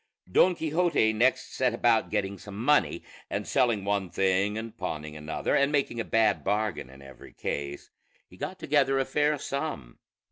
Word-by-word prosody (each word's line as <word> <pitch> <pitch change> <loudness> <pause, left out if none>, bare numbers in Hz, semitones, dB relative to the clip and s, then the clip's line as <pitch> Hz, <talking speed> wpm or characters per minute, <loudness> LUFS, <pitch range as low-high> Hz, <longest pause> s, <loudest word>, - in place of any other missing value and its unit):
Don 180 - +5
Quixote 160 -8 +1
next 125 +4 +1
set 125 -3 +1
about 115 -2 +2
getting 100 -2 -2
some 100 +1 -10
money; 145 +7 +2 0.3
and - - -3
selling 115 -6 +1
one 100 -2 0
thing 95 +3 +1
and 115 0 -6
pawning 75 -7 -5
another, 75 +1 -2
and 140 +1 +3
making 140 -5 0
a - - 0
bad 110 -1 +2
bargain 105 -8 -1
in 65 +1 -14
every 70 0 -13
case, 70 0 -5 0.4
he - - -17
got - - -5
together 135 -2 +2
a 135 - +1
fair 150 +2 +1
sum. 140 - -5
110 Hz, 170 wpm, -28 LUFS, 95-135 Hz, 0.4 s, Don